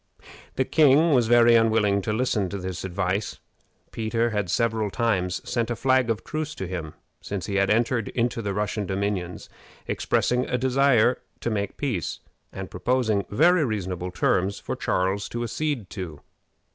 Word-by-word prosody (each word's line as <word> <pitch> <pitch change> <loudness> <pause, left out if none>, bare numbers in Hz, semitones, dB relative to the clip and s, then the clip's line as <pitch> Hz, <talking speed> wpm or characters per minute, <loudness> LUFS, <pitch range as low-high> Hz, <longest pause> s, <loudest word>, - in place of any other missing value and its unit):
The 130 - +1
king 155 +2 +5
was 120 -4 +3
very 120 0 +6
unwilling 110 -3 +3
to 105 - -2
listen 110 -4 0
to 100 - -4
this 95 -2 -5
advice. 95 +2 -2 0.5
Peter 115 +1 -1
had 105 -4 -1
several 110 -1 +1
times 95 -5 -1
sent 120 -2 -1
a 120 - -1
flag 130 0 +2
of 110 -3 -1
truce 155 -1 -4
to 95 - -4
him 85 -4 -5 0.3
since 100 -3 -4
he 100 - -2
had 100 0 +2
entered 115 0 +1
into 120 -1 -1
the 100 -2 -3
Russian 105 -1 -2
dominions, 95 -2 -3 0.4
expressing 125 +1 0
a 125 - +1
desire 130 -2 +3 0.2
to 120 - -1
make 100 -2 -2
peace, 120 - -2 0.3
and - - -7
proposing 110 -5 0
very 165 - +4
reasonable 95 -7 -3
terms 95 +2 +1
for - - -4
Charles 95 +2 -1
to 120 0 -3
accede 120 -2 -2
to. 85 -7 -6
110 Hz, 160 wpm, -25 LUFS, 95-125 Hz, 0.5 s, very